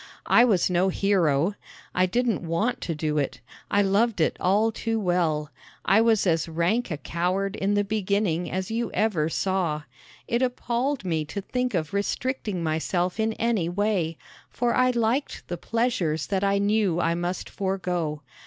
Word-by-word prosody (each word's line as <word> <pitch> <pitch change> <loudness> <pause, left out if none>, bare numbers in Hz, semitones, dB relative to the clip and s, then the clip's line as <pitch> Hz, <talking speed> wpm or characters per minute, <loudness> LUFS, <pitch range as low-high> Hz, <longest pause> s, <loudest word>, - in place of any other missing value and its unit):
I - - +6
was 200 -8 +3
no 180 +1 +2
hero. 180 -4 +2 0.4
I 185 +1 +3
didn't 235 +2 0
want 175 +8 -1
to 165 - -3
do 150 0 -1
it. 140 - -2 0.3
I 205 0 +3
loved 205 +2 +2
it 155 - +2
all 210 +5 +3
too 225 +1 -2
well. 165 -6 0 0.3
I 220 - +5
was 225 -3 +3
as 165 -2 +1
rank 175 +9 0
a 155 - -3
coward 185 +5 -1
in 200 +2 0
the 205 - +3
beginning 200 -4 0
as 190 +2 -3
you 235 +1 -1
ever 180 -8 +1
saw! 170 -4 -1 0.4
It 235 +1 0
appalled 250 0 -1
me 160 -3 0
to 200 +6 -5
think 250 +2 -2
of 155 -1 -2
restricting 205 -2 -2
myself 175 +4 -1
in 220 0 +1
any 220 -8 0
way, 180 -4 0 0.3
for 240 0 0
I 255 0 +4
liked 240 +3 -1
the 175 - -3
pleasures 225 -10 0
that 195 -1 -1
I 200 0 +2
knew 200 -3 +2
I 170 -1 +2
must 175 +1 -3
forego. 180 -6 -2
195 Hz, 165 wpm, -25 LUFS, 170-220 Hz, 0.4 s, I